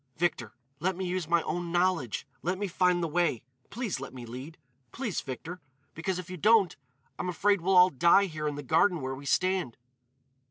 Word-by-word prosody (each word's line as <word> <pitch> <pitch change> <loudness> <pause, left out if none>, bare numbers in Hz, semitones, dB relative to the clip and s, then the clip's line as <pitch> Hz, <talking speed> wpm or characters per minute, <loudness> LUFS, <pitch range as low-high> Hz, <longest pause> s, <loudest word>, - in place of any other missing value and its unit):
Victor, 155 -10 -1 0.2
let 185 +3 0
me 190 +1 -4
use 180 -2 -2
my 170 0 +2
own 170 +2 -3
knowledge! 175 - 0 0.2
Let 180 +3 -1
me 205 +1 -2
find 180 -1 +2
the - - 0
way. 160 -7 0 0.3
Please 225 - -3
let 135 -1 -8
me 125 -2 -8
lead! 130 +7 -8 0.3
Please, 235 -7 -3
Victor. 165 +7 -7 0.3
Because, 175 +3 -2
if 180 -2 -6
you 185 0 -7
don't, 210 -1 +4 0.4
I'm 180 - -2
afraid 200 +1 +2
we'll 185 +2 +3
all 180 +1 +7
die 170 +8 +5
here 155 -4 -4
in 145 - -2
the 145 - -6
garden 165 +6 +3
where 130 0 -3
we 140 +1 -8
stand." 185 -7 +1
175 Hz, 195 wpm, -29 LUFS, 150-185 Hz, 0.4 s, all